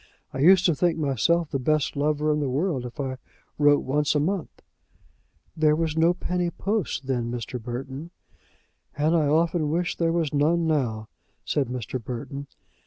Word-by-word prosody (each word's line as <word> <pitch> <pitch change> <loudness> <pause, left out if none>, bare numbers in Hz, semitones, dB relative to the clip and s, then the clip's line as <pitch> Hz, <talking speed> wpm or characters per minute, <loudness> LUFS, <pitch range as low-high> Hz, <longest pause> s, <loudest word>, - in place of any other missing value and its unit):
I 135 - -4
used 185 +6 +6
to 170 - +4
think 170 +3 +1
myself 155 +3 +1
the 135 - -1
best 150 +2 0
lover 150 +1 +1
in 150 - 0
the 145 -3 -1
world 135 -2 -1
if 120 +6 -13
I 130 -2 -3 0.4
wrote 145 -1 +5
once 145 +3 +1
a - - +3
month." 175 +2 -3 0.9
"There 155 -1 +3
was 160 -1 -1
no 165 +2 +3
penny 180 -1 -1
post 195 -6 -2
then, 125 -3 -1
Mr. 120 0 -5
Burton." 130 +6 -6 0.9
"And 155 +3 +2
I 155 -3 +3
often 160 +1 +2
wish 170 +3 -1
there 165 -1 +1
was 165 -4 0
none 160 +4 +2
now," 120 -9 0 0.4
said 140 -3 0
Mr. 125 0 -5
Burton. 140 +4 -6
150 Hz, 170 wpm, -25 LUFS, 135-165 Hz, 0.9 s, used